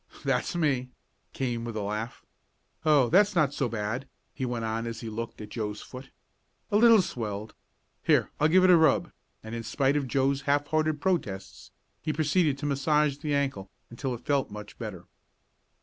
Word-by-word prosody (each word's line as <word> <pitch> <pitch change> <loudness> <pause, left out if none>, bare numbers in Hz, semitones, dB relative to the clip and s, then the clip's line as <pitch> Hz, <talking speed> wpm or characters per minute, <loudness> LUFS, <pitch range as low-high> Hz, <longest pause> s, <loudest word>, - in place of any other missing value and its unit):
"That's - - 0
me," 135 -7 +1 0.4
came 120 -3 -2
with 115 -1 -5
a - - -1
laugh. 105 +4 -4 0.6
"Oh, 150 -5 +5
that's 205 +3 +4
not 150 -5 +3
so 135 -4 -1
bad," 115 +4 -3 0.3
he 130 - -3
went 120 -2 -2
on 115 +1 -2
as 115 -1 -5
he 115 - -5
looked 115 +1 -5
at 105 - -8
Joe's 105 -2 -4
foot. 130 +1 -10 0.6
"A 205 - +4
little 225 -3 +7
swelled. 105 - -5 0.5
Here, - - +2
I'll 155 - +4
give 185 +4 +5
it 185 - +7
a 175 - +8
rub," 160 -4 +3 0.3
and 110 +1 -8
in 115 - -3
spite 135 +5 +1
of 145 -2 0
Joe's 135 +2 +1
half 145 0 +3
hearted 155 -1 +1
protests 125 - -2 0.3
he 155 - -1
proceeded 155 -1 +2
to 145 - -5
massage 145 0 +2
the 145 -1 -1
ankle 135 -9 -1 0.2
until 125 +1 -3
it 120 - -13
felt 140 -4 +1
much 105 0 -10
better. 100 -7 -6
135 Hz, 180 wpm, -28 LUFS, 115-150 Hz, 0.6 s, a